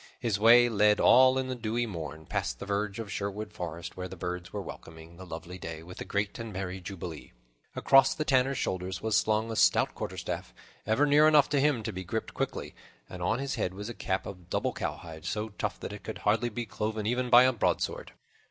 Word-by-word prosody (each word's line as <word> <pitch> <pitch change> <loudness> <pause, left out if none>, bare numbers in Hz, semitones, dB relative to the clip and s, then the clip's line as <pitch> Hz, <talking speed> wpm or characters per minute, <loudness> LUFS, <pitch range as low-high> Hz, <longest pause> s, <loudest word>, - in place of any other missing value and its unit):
His 115 -4 -1
way 120 +3 +7
led, 105 -2 +3
all 130 0 +6
in 130 0 -1
the 130 - -2
dewy 120 0 -1
morn, 80 -6 -7
past - - -2
the - - -7
verge 100 0 -2
of 115 -3 -6
Sherwood 105 +1 -4
Forest, 85 -4 -6
where 90 0 -5
the 95 - -9
birds 90 0 -5
were - - -4
welcoming 80 +1 -10
the 95 0 -10
lovely 85 +2 -8
day 80 -1 -7
with 90 +2 -10
a - - -4
great 100 +2 -2
and 115 -1 -5
merry 95 -1 -5
jubilee. 85 -5 -8 0.4
Across 135 -1 +5
the 155 - -2
Tanner's 135 -1 +2
shoulders 95 -1 -3
was 110 -1 +1
slung 110 +1 +1
his 110 - -1
stout - - +4
quarterstaff, - - -5 0.3
ever 110 +7 +3
near 150 +1 +6
enough 150 -3 +5
to 145 - +2
him 140 -6 +2
to - - -4
be 95 0 -5
gripped 110 +5 -4
quickly, - - -3 0.3
and 90 - -9
on 110 +6 +1
his 135 +1 -3
head 90 - -1
was 105 +3 -6
a - - -5
cap 95 -4 -2
of 90 -2 -9
doubled - - -1
cowhide, 80 -2 -5
so 105 +1 -2
tough 105 - -4
that - - -6
it - - -8
could - - -6
hardly 115 +3 +2
be 120 +1 -4
cloven 105 +1 -3
even 125 +2 0
by 120 +1 +8
a 130 0 +4
broadsword. 115 - -1
105 Hz, 220 wpm, -29 LUFS, 90-120 Hz, 0.4 s, by